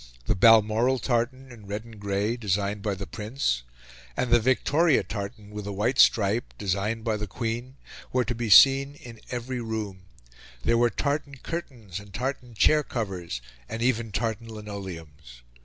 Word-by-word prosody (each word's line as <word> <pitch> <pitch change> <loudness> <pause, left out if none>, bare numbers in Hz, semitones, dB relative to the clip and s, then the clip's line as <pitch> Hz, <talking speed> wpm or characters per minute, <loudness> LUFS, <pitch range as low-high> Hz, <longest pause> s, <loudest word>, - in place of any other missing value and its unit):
The - - +2
Balmoral 115 +4 +5
tartan, 130 +2 -1
in 110 -4 -13
red 105 +3 -4
and 115 -2 -13
grey, 100 +3 0
designed 105 -2 -1
by 100 -1 -1
the 100 +1 -6
Prince, 105 - -2 0.6
and 125 - 0
the 120 - +7
Victoria 130 +5 +3
tartan, 100 +1 -6
with 105 -1 -6
a - - -3
white 110 +7 0
stripe, 110 +2 +4
designed 100 +3 -1
by 110 -2 0
the 105 0 -4
Queen, 120 +5 -4 0.4
were 125 -1 +1
to 120 - -1
be 115 -1 -3
seen 135 +5 +7
in 115 -5 -12
every 125 0 -3
room: 110 -4 -4 0.7
there 115 0 +3
were 120 0 +4
tartan 140 +4 -2
curtains, 125 - -6
and 100 -1 -12
tartan 125 -1 -4
chair 150 +8 +5
covers, 95 - -4 0.3
and 115 +1 -3
even 115 -3 +1
tartan 110 +2 -2
linoleums. 85 - -9
110 Hz, 160 wpm, -26 LUFS, 100-125 Hz, 0.7 s, the